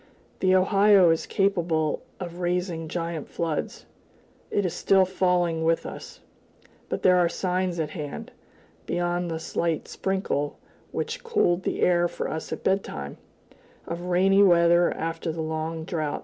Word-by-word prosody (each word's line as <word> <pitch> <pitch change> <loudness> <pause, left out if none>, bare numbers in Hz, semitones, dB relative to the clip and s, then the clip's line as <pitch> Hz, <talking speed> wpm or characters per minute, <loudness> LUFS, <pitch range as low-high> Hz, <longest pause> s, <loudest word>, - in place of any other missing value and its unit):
The 185 0 +3
Ohio 195 -1 +5
is 165 - -1
capable 170 -6 0 0.2
of 175 -1 -7
raising 175 -2 -1
giant 165 -1 -4
floods; 165 -3 -3 0.6
it 205 - 0
is 175 - -1
still 190 +1 +3
falling 180 -3 +1
with 165 0 +1
us, - - -9 0.7
but - - -3
there 180 -1 +6
are 175 -1 +3
signs 180 -1 -1
at 155 -1 -2
hand, 150 -4 -6 0.6
beyond 175 0 -1
the 165 - -2
slight 165 0 -2
sprinkle 190 -7 -2 0.3
which 460 +2 -4
cooled 420 - +1
the - - -3
air 175 -1 +3
for - - -4
us 160 - -5
at - - -5
bedtime, 75 - -2 0.7
of 170 +1 -5
rainy 190 +2 +4
weather 175 -2 +5
after 165 0 -3
the 160 +1 -4
long 160 +1 -3
drouth. 155 -4 -2
175 Hz, 145 wpm, -25 LUFS, 165-185 Hz, 0.7 s, there